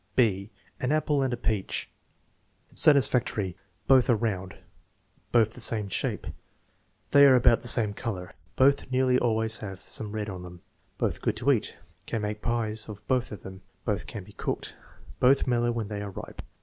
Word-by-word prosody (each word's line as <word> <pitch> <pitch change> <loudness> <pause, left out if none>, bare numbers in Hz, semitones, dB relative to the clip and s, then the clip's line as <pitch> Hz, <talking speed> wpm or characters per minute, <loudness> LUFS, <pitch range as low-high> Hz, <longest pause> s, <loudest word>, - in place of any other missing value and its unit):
(6) 100 -5 +2 0.3
An 125 - -1
appk 150 -2 +1
and 130 - 0
a 120 - -2
peach 110 -5 -2 0.9
Satisfactory. 125 - +3 0.3
"Both 130 -2 +5
are 120 - +5
round." 100 -4 -3 0.7
"Both 110 -2 +3
the - - -11
same 110 -3 +2
shape." 90 - -2 0.9
"They 140 0 +8
are 130 - +7
about 120 -2 +4
the 120 - -2
same 110 -4 +4
color." 95 -5 -5 0.2
"Both 135 0 +3
nearly 130 0 +3
always 110 -1 0
have 95 -3 -7
some 105 +1 -5
red 105 -1 -3
on 95 -3 -6
them." 90 -1 -11 0.3
"Both - - -2
good - - 0
to 140 +4 +2
eat." 115 -6 -1 0.3
"Can 115 -3 -2
make 105 0 -3
pies 110 -2 -1
of 105 0 -10
both 130 -2 0
of 100 -5 -8
them." 95 0 -10 0.2
"Both 105 -3 -2
can 105 -4 -7
be 105 +2 -16
cooked." - - -4 0.4
"Both 135 +2 +4
mellow 120 -1 +1
when 115 -3 -3
they 105 -1 -4
are 100 - -5
ripe." 95 - -8
110 Hz, 175 wpm, -27 LUFS, 105-125 Hz, 0.9 s, They